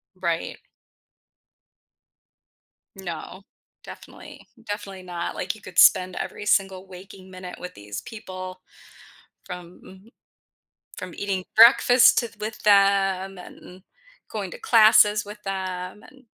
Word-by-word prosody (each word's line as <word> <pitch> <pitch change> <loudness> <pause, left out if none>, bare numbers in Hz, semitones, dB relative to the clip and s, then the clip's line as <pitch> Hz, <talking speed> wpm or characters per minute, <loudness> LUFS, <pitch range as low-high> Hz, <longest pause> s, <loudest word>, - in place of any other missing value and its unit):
Right. 170 -3 -3 2.4
No. 185 0 -8 0.4
Definitely. - - -13 0.2
Definitely 200 -2 -6
not. 175 -1 -5
Like, 185 +3 -3
you 215 - -16
could 185 -3 -3
spend 185 0 +5
every 210 - -6
single 195 -2 +1
waking 190 0 -13
minute 185 -1 -9
with 180 - -8
these 100 0 -8
people 185 -4 -9 0.8
from 180 -1 -10
m 190 +4 -16 0.9
from 185 -1 -8
eating 195 -2 -3
breakfast 240 +2 +7
to 235 -2 -2
with 215 +1 -6
them, 195 -2 +2
and 180 +1 -13 0.5
going - - -5
to - - -10
classes 215 - +5
with 210 +1 -11
them. 190 0 -5
And, 265 +1 -19
190 Hz, 115 wpm, -24 LUFS, 185-210 Hz, 2.4 s, breakfast